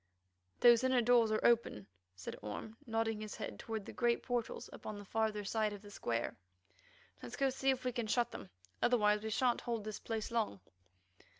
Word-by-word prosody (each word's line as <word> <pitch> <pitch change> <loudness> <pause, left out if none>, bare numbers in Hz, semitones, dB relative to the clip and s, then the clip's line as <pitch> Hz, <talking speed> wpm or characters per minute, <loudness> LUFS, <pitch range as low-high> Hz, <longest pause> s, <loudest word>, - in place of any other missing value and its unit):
"Those 240 0 +7
inner 260 -1 +4
doors 235 -1 +5
are 215 - +2
open," 230 - +3 0.3
said 95 - -6
Orme, 105 - -6
nodding 225 -1 0
his 215 -1 -6
head - - -6
toward 220 -3 -4
the - - -8
great 240 -1 +1
portals 245 -2 -2
upon 215 - -7
the 205 - -9
farther 220 0 0
side 215 +1 0
of 205 0 -9
the 205 - -11
square. 120 - -2 0.9
"Let's 120 - -7
go 270 -1 +2
see 265 +1 0
if 260 -1 +1
we 250 - +1
can 240 -2 -2
shut 240 +2 +1
them. 100 - -8 0.3
Otherwise 210 -4 +4
we 220 - -3
shan't 240 +3 +2
hold 230 -3 -2
this 215 0 -5
place 225 -1 -3
long." 220 - 0
225 Hz, 190 wpm, -35 LUFS, 210-240 Hz, 0.9 s, Those